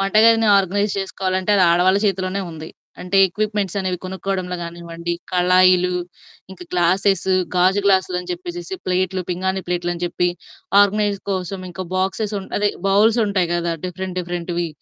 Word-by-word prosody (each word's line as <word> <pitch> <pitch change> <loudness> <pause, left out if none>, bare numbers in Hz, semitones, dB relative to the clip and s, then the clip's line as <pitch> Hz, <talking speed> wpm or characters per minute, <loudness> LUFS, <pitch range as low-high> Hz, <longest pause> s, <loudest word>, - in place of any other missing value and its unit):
వంటగదిని 220 +3 +4
organise 200 +2 0
చేసుకోవాలంటే 190 0 -2
అది 190 - +4
ఆడవాళ్ళ 180 +3 +4
చేతిలోనే 190 0 -1
ఉంది. 160 0 -8 0.3
అంటే 180 +2 -2
ఎక్విప్‌మెంట్స్ 205 0 -2
అనేవి 185 -2 -2
కొనుక్కోవడంలో 185 -1 -3
గానివ్వండి, 170 0 -6 0.2
కళాయిలు, 180 0 +4 0.6
ఇంకా 185 -2 -10
గ్లాసెస్, 185 +2 +2 0.3
గాజు 185 +3 +3
గ్లాసులు 190 -2 +2
అని 180 - -11
చెప్పేసేసి, 350 +1 -6
ప్లేట్లు, 185 0 0
పింగాణీ 190 +2 -1
ప్లేట్లు 175 0 -1
అని 170 - -8
చెప్పి 175 0 0 0.5
ఆర్గనైజ్ 205 0 +2
కోసం 190 0 -3
ఇంకా 185 +2 -6
బాక్సెస్ 195 +3 -1
ఉం 195 - -7
అదే 205 0 +2 0.2
బౌల్స్ 215 +4 +4
ఉంటాయి 190 -4 0
గదా! 170 0 -1
డిఫరెంట్ 185 +1 -5
డిఫరెంట్‌వి. 175 -1 -3
185 Hz, 140 wpm, -20 LUFS, 180-195 Hz, 0.6 s, వంటగదిని